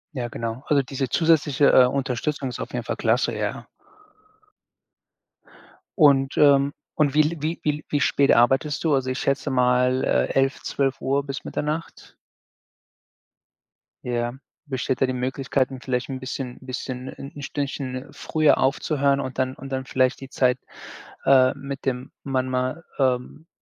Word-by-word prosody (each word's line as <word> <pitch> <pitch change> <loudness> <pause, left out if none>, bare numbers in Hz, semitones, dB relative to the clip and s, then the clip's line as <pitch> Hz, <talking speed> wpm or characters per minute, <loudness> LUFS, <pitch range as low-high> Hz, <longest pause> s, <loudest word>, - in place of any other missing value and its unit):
Ja, 120 -2 -2
genau. 115 +2 -5
Also, 140 -2 +3
diese 135 0 -3
zusätzliche, 150 -4 +3
äh, 130 - +8
Unterstützung 135 +1 -2
ist 125 - -7
auf - - -5
jeden - - -4
Fall - - -3
klasse, - - +1
ja. - - -3 2.3
Und, 140 -3 +4
ähm 140 -1 +5 0.2
und 145 -2 +2
wie 155 - +6
l 165 +2 -2
wie 160 +2 -2
wie 150 0 -1
wie 145 - +1
spät 140 -1 +3
arbeitest 135 +5 +2
du? 160 -3 +2
Also, 130 -2 +1
ich 130 - -2
schätze 140 +1 0
mal, 125 0 +2
äh, 65 0 +2
11:00, 135 0 +1
12:00 135 0 -1
bis 135 -1 -6
Mitternacht? 155 +2 -5 1.9
Ja, 120 -1 -1 0.3
besteht 130 -3 -2
da 130 - +4
die 130 - -2
Möglichkeit 130 +1 -1
'n 130 - -7
vielleicht 125 0 -2
'n 130 -1 -4
bisschen 130 -1 -5
bisschen 130 0 -6
'n 140 +2 -9
Stündchen 135 -2 -4
früher 155 -1 +2
aufzuhören 140 0 +1
und 130 -2 -6
dann 130 0 0
und 135 +1 -9
dann 130 0 -2
vielleicht 130 0 +1
die 135 - -8
Zeit, 125 -2 +1 0.7
äh, 130 -1 +6
mit 140 0 -7
dem 130 -1 -2
Mann 130 -2 -1
mal 130 +5 -2 0.2
ähm, 130 +4 -1
135 Hz, 150 wpm, -24 LUFS, 130-140 Hz, 2.3 s, äh